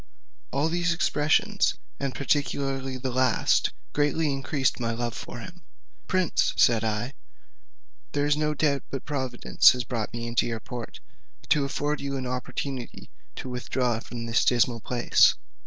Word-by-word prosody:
All 140 Hz, +4 st, +1 dB
these 170 Hz, 0 st, +1 dB
expressions, 155 Hz, -3 st, +2 dB, 0.2 s
and 140 Hz, -2 st, -2 dB
particularly 135 Hz, -1 st, -1 dB
the 130 Hz, 0 st, -3 dB
last, 130 Hz, +1 st, +2 dB, 0.2 s
greatly 145 Hz, 0 st, +1 dB
increased 135 Hz, -1 st, 0 dB
my 115 Hz, -1 st, -1 dB
love 120 Hz, 0 st, -2 dB
for -, -, -7 dB
him. 175 Hz, +4 st, -11 dB, 0.5 s
"Prince," 185 Hz, -2 st, +1 dB
said 115 Hz, -2 st, +4 dB
I, 110 Hz, +4 st, -2 dB, 1.0 s
"there 145 Hz, 0 st, +1 dB
is 145 Hz, 0 st, +3 dB
no 150 Hz, 0 st, 0 dB
doubt 140 Hz, -2 st, +1 dB
but 135 Hz, -, -5 dB
Providence 130 Hz, -5 st, +3 dB
has 125 Hz, -1 st, -3 dB
brought 115 Hz, -1 st, -3 dB
me 115 Hz, 0 st, -5 dB
into 115 Hz, 0 st, +1 dB
your 115 Hz, -1 st, -3 dB
port, 120 Hz, -1 st, -7 dB, 0.5 s
to 145 Hz, -2 st, +3 dB
afford 145 Hz, +2 st, -2 dB
you 140 Hz, -1 st, -3 dB
an 130 Hz, -, -4 dB
opportunity 125 Hz, 0 st, -5 dB, 0.3 s
of -, -, -6 dB
withdrawing 125 Hz, -2 st, -1 dB
from 120 Hz, -1 st, -7 dB
this 115 Hz, 0 st, +2 dB
dismal 120 Hz, -1 st, +3 dB
place. 120 Hz, +2 st, +4 dB
130 Hz, 150 wpm, -26 LUFS, 120-145 Hz, 1.0 s, said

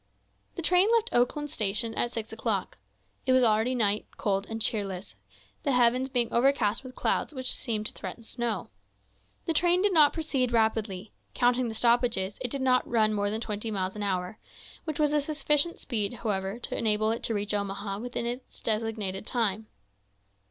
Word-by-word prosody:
The 340 Hz, -, -5 dB
train 360 Hz, +4 st, +4 dB
left 460 Hz, 0 st, 0 dB
Oakland 280 Hz, +4 st, +1 dB
station 215 Hz, +2 st, -1 dB
at 240 Hz, -, -1 dB
six 225 Hz, -2 st, -5 dB
o'clock. 225 Hz, -, -2 dB, 0.5 s
It 260 Hz, -, +5 dB
was 255 Hz, 0 st, +5 dB
already 225 Hz, +3 st, +3 dB
night, 210 Hz, -3 st, +1 dB
cold 195 Hz, -1 st, -1 dB
and 225 Hz, 0 st, -4 dB
cheerless, 195 Hz, -, -2 dB, 0.5 s
the 280 Hz, -, 0 dB
heavens 250 Hz, +2 st, +3 dB
being 245 Hz, -3 st, +1 dB
overcast 235 Hz, -3 st, +2 dB
with 255 Hz, -1 st, -10 dB
clouds 305 Hz, -, 0 dB
which 255 Hz, -1 st, 0 dB
seemed 215 Hz, -3 st, -2 dB
to -, -, -1 dB
threaten 230 Hz, -, -7 dB
snow. 225 Hz, -, -3 dB, 0.7 s
The 330 Hz, -, 0 dB
train 350 Hz, +3 st, +3 dB
did 410 Hz, -2 st, +3 dB
not 300 Hz, -3 st, +6 dB
proceed 275 Hz, -6 st, -1 dB
rapidly; 220 Hz, -3 st, 0 dB, 0.2 s
counting 245 Hz, 0 st, +2 dB
the 220 Hz, -, -6 dB
stoppages, 235 Hz, -4 st, +2 dB
it 250 Hz, -, -1 dB
did 275 Hz, +1 st, -3 dB
not 255 Hz, -1 st, +3 dB
run 220 Hz, -2 st, +3 dB
more 205 Hz, -1 st, 0 dB
than 220 Hz, +2 st, -3 dB
twenty 215 Hz, 0 st, -2 dB
miles 190 Hz, -2 st, -2 dB
an 210 Hz, -, -5 dB
hour, 185 Hz, 0 st, -2 dB, 0.5 s
which 310 Hz, -2 st, -4 dB
was 300 Hz, -1 st, +3 dB
a 300 Hz, -, +3 dB
sufficient 300 Hz, +2 st, +1 dB
speed, 215 Hz, -4 st, -2 dB
however, 200 Hz, -3 st, -2 dB
to 240 Hz, -, -4 dB
enable 215 Hz, 0 st, +2 dB
it 230 Hz, -, -2 dB
to 225 Hz, -, -2 dB
reach 205 Hz, +1 st, -2 dB
Omaha 200 Hz, 0 st, -3 dB
within 245 Hz, 0 st, -4 dB
its 245 Hz, +2 st, -6 dB
designated 215 Hz, -3 st, -2 dB
time. 220 Hz, -3 st, -1 dB
230 Hz, 180 wpm, -28 LUFS, 210-255 Hz, 0.7 s, not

